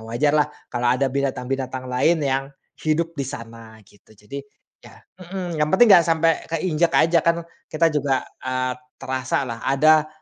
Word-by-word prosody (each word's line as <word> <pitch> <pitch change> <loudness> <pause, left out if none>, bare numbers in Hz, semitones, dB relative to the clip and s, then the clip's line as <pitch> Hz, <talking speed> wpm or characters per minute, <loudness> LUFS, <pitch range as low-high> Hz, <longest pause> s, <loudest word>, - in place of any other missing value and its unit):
wajarlah 145 +5 +2 0.2
kalau 120 0 0
ada 130 +3 +2
binatang-binatang 130 -1 -3
lain 130 +7 +2
yang 135 0 0 0.4
hidup 165 +2 0
di 140 -4 -4
sana 115 -2 -9
gitu. 105 +2 -23
Jadi, 105 +8 -8 0.4
ya - - -16 0.2
mhm, 180 -2 -5
yang 150 - +2
penting 190 +8 +5
gak 175 -3 +7
sampe 165 0 +3 0.2
keinjek 165 0 0
aja, 165 +1 +4
kan 170 0 +1 0.3
kita 160 +1 +2
juga, 140 -3 0 0.2
eee, 130 0 -2 0.2
terasalah. 130 -2 -3
Ada, 155 +3 +4
140 Hz, 145 wpm, -22 LUFS, 130-165 Hz, 0.4 s, gak